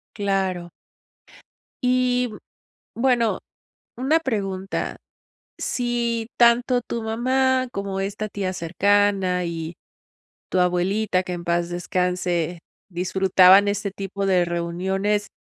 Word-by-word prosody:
Claro. 190 Hz, -4 st, -1 dB, 1.2 s
Y, 250 Hz, -1 st, +2 dB
mm, 210 Hz, -, -9 dB, 0.6 s
bueno, 245 Hz, -4 st, +2 dB, 0.6 s
una 275 Hz, +6 st, +2 dB
pregunta, 195 Hz, -9 st, -3 dB, 0.6 s
si 235 Hz, -2 st, -1 dB
tanto 245 Hz, +1 st, +4 dB
tu 235 Hz, -1 st, -5 dB
mamá 255 Hz, +3 st, +1 dB
como 200 Hz, -1 st, -3 dB
esta 205 Hz, +2 st, -3 dB
tía 195 Hz, -3 st, -3 dB
cercana 190 Hz, +1 st, +1 dB
y 165 Hz, -1 st, -4 dB, 0.8 s
tu 185 Hz, -, +2 dB
abuelita, 185 Hz, +2 st, +1 dB
que 180 Hz, -, -4 dB
en 170 Hz, -, -7 dB
paz 170 Hz, 0 st, 0 dB
descanse, 175 Hz, -1 st, -1 dB, 0.3 s
disfrutaban 190 Hz, +2 st, +5 dB
este 200 Hz, 0 st, -1 dB
tipo 195 Hz, 0 st, -5 dB
de 185 Hz, -2 st, +3 dB
reuniones. 190 Hz, +5 st, -1 dB
195 Hz, 100 wpm, -23 LUFS, 180-230 Hz, 1.2 s, disfrutaban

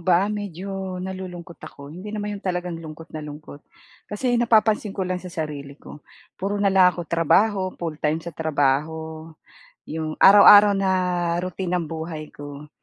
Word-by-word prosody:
ba, 180 Hz, +4 st, +2 dB
medyo 195 Hz, -1 st, -5 dB
nalulungkot 180 Hz, -2 st, -8 dB
ako, 140 Hz, +1 st, -11 dB
hindi 185 Hz, +5 st, -9 dB
naman 210 Hz, 0 st, -4 dB
'yon -, -, -11 dB
talagang 180 Hz, -2 st, -3 dB
lungkot 160 Hz, +1 st, -11 dB
na 155 Hz, -, -5 dB
lungkot. 150 Hz, -1 st, -10 dB, 0.5 s
Kasi 245 Hz, +4 st, -1 dB
napapansin 220 Hz, -3 st, +2 dB
ko 190 Hz, -, -1 dB
lang 180 Hz, 0 st, -3 dB
sa 180 Hz, -, -8 dB
sarili 150 Hz, -4 st, -6 dB
ko 150 Hz, -, -13 dB, 0.4 s
puro 200 Hz, +2 st, -1 dB
nalang 190 Hz, -3 st, +4 dB
ako -, -, -4 dB
trabaho, 190 Hz, +6 st, +2 dB
full-time 155 Hz, -2 st, -2 dB
sa 170 Hz, -, -6 dB
trabaho. 160 Hz, +1 st, -1 dB, 0.6 s
Yung 155 Hz, 0 st, -5 dB
araw-araw 205 Hz, +1 st, +9 dB
na 195 Hz, -1 st, +1 dB, 0.5 s
routine 185 Hz, 0 st, -4 dB
ng 170 Hz, -, -4 dB
buhay 160 Hz, -1 st, -6 dB
ko, 145 Hz, 0 st, -9 dB
175 Hz, 150 wpm, -23 LUFS, 155-195 Hz, 0.6 s, araw-araw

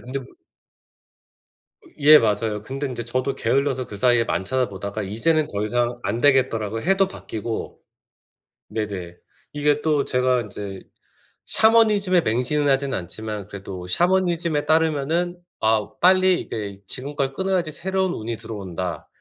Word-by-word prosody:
근데 130 Hz, +3 st, -5 dB
무 125 Hz, -, -15 dB, 1.6 s
예 150 Hz, +1 st, +8 dB
맞아요. 105 Hz, -1 st, 0 dB
근데 135 Hz, +5 st, -4 dB
인제 125 Hz, -3 st, -5 dB
저도 130 Hz, +3 st, -1 dB
게을러서 130 Hz, +1 st, 0 dB
그사이에 115 Hz, +3 st, +2 dB
안 -, -, 0 dB
찾아보다가 100 Hz, -4 st, -2 dB
이제는 145 Hz, +11 st, +1 dB
더 105 Hz, 0 st, -2 dB
이상 120 Hz, +2 st, 0 dB
안 115 Hz, +4 st, -2 dB
되겠더라고요. 115 Hz, -6 st, +2 dB
해도 195 Hz, +2 st, +3 dB
바뀌고. 110 Hz, -, -6 dB, 0.9 s
네네. 95 Hz, -5 st, -5 dB, 0.4 s
이게 145 Hz, 0 st, +1 dB
또 150 Hz, -3 st, +2 dB
제가 125 Hz, 0 st, +1 dB
인제 100 Hz, -2 st, -7 dB, 0.6 s
샤머니즘에 210 Hz, -5 st, +4 dB
맹신은 125 Hz, +6 st, 0 dB
하진 135 Hz, 0 st, +1 dB
않지만 105 Hz, +3 st, -5 dB
그래도 95 Hz, -3 st, -8 dB
샤머니즘에 170 Hz, -, +1 dB
따르면은 160 Hz, +2 st, +1 dB, 0.2 s
아 110 Hz, -1 st, +2 dB
'빨리 185 Hz, 0 st, +5 dB
이게 100 Hz, -2 st, -5 dB
지금 140 Hz, +3 st, -3 dB
걸 135 Hz, -2 st, -1 dB
끊어야지 185 Hz, -2 st, -1 dB
새로운 190 Hz, +2 st, -1 dB
운이 115 Hz, +1 st, -4 dB
들어온다.' 90 Hz, -6 st, -5 dB
130 Hz, 310 characters per minute, -23 LUFS, 105-155 Hz, 1.6 s, 예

